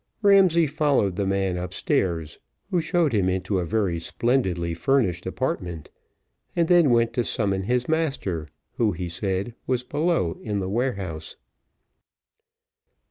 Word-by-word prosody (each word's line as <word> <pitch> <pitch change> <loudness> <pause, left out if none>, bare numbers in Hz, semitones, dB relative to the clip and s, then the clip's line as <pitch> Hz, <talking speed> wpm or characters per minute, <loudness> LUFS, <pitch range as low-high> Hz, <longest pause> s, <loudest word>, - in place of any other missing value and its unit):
Ramsay 190 -5 +5
followed 140 - +1
the 100 0 -1
man 95 -2 0
upstairs, 90 - -1 0.3
who 180 -3 +2
showed 160 -3 +1
him 95 -4 +2
into 95 +1 -1
a 90 - -1
very 95 -3 0
splendidly 90 -6 0
furnished 90 -1 +1
apartment, 85 -4 -3 0.6
and 170 -1 +2
then 175 -4 +5
went 115 -1 +3
to 120 -1 +1
summon 100 -5 0
his 125 +2 0
master, 135 - -1 0.3
who, 110 -4 +2
he 90 +1 -4
said, 95 +5 -2
was 125 -1 0
below 145 - 0
in 105 -2 -3
the 95 -1 -3
warehouse. 100 -9 -3
100 Hz, 135 wpm, -24 LUFS, 90-135 Hz, 0.6 s, Ramsay